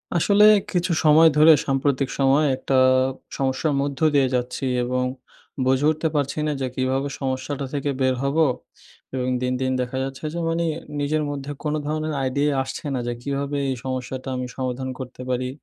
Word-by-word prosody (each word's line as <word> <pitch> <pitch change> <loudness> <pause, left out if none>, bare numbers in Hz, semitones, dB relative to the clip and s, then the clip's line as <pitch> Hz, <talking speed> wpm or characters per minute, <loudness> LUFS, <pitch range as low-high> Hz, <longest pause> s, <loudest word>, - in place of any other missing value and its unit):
আসলে 200 +5 +4 0.3
কিছু 180 0 0
সময় 155 +1 +7
ধরে 155 +2 +8
সাম্প্রতিক 135 0 0
সময়ে 140 +3 +4
একটা 135 - -1 0.6
সমস্যার 135 +3 0
মধ্য 140 -1 -3 0.2
দিয়ে 135 -2 +4
যাচ্ছি 125 +2 -2 0.2
এবং 125 +1 0 0.6
বুঝে 130 +2 +2
উঠতে 155 +1 -1
পারছি 145 0 -1
না - - +1
যে 130 - 0
কীভাবে 130 +2 0
সমস্যাটা 135 +1 -3
থেকে 145 0 -1
বের 130 -1 +2
হবো? 150 +4 +3 0.7
এবং 130 -1 -2
দিন, 125 0 0
দিন 130 0 0
দেখা 125 +1 -4
যাচ্ছে 135 +1 -6
যে 170 - -3
মানি 165 +1 0 0.3
নিজের 150 +2 0
মধ্যে 140 0 -5
কোনো 150 0 -1
ধরনের 155 +1 -2
আইডিয়া 140 +3 +1
আসছে 130 +4 -7
না। 130 - -1
যে 120 - -1
কীভাবে 140 +2 -2
এই 130 - -1
সমস্যাটা 130 0 -4
আমি 125 0 -3
সমাধান 130 0 -3
করতে 130 -1 -8
পারি। 125 0 -1
135 Hz, 170 wpm, -23 LUFS, 130-150 Hz, 0.7 s, ধরে